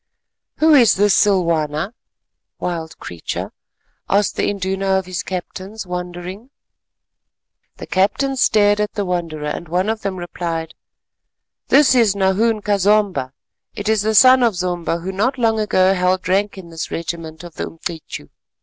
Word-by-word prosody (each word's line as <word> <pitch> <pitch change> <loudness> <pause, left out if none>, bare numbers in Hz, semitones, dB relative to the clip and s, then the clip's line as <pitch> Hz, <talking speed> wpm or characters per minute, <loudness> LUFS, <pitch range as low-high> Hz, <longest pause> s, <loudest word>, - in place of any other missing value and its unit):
"Who 315 0 +5
is 245 -6 +6
this 205 0 +3
Silwana 170 -3 +1 0.6
(wild 165 -2 -4
creature)?" 85 -2 -6 0.6
asked 200 +1 +2
the - - 0
Induna 195 -1 -1
of 190 - -2
his 185 -1 -4
captains 190 +3 -6
wondering. 180 +5 -6 1.3
The - - -8
captains 260 +8 0
stared 205 -1 +4
at 210 - -2
the 205 -2 -2
wanderer, 170 -4 -3
and 150 +3 -4
one 180 +5 0
of 220 0 -2
them 195 -2 -3
replied, 170 -2 -4 0.9
"This 280 0 +5
is 230 -5 +3
Nahoon 205 +3 +1
ka 205 -1 +1
Zomba, 195 -9 +1 0.4
it 205 - -5
is 220 -1 +2
the 220 +1 0
son 255 +4 +7
of 230 -5 +2
Zomba 175 -2 -2
who 190 - -3
not 225 +8 0
long 225 -2 +1
ago 190 -3 +3
held 185 0 0
rank 200 +2 0
in 180 -3 -10
this 165 -1 -5
regiment 165 -1 -5
of 175 -2 -10
the - - -4
Umcityu. 165 - -7
190 Hz, 150 wpm, -19 LUFS, 175-210 Hz, 1.3 s, son